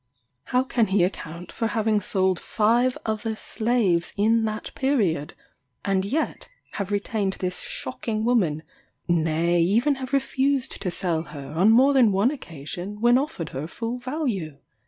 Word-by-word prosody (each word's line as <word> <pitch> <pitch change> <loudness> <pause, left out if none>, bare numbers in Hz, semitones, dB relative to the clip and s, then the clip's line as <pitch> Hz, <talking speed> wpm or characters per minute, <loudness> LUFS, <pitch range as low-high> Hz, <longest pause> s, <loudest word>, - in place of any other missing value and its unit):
How 250 +1 +2
can 240 -4 +1
he 190 -1 +3
account 175 -1 -4
for 225 - -1
having 220 -2 +1
sold 190 -1 +1
five 235 +4 +2
other 220 0 -2
slaves 215 -7 +1
in 225 +2 +3
that 215 0 -4
period, 205 - 0 0.5
and 195 -1 +1
yet 280 +11 -2 0.2
have 200 -2 -4
retained 205 -1 -1
this 180 -1 -3
shocking 215 - -3
woman 180 -11 +2 0.4
nay, 170 +1 +2
even 230 - +3
have 260 0 -5
refused 275 -1 0
to 185 - -1
sell 175 -2 -1
her, 140 -4 -9
on 180 +7 +3
more 260 +5 +6
than 250 -6 +5
one 200 +7 +3
occasion, 180 - -7
when 240 +3 +5
offered 270 - -4
her 140 +4 -5
full 230 +6 -4
value? 245 - -3
210 Hz, 150 wpm, -25 LUFS, 175-240 Hz, 0.5 s, more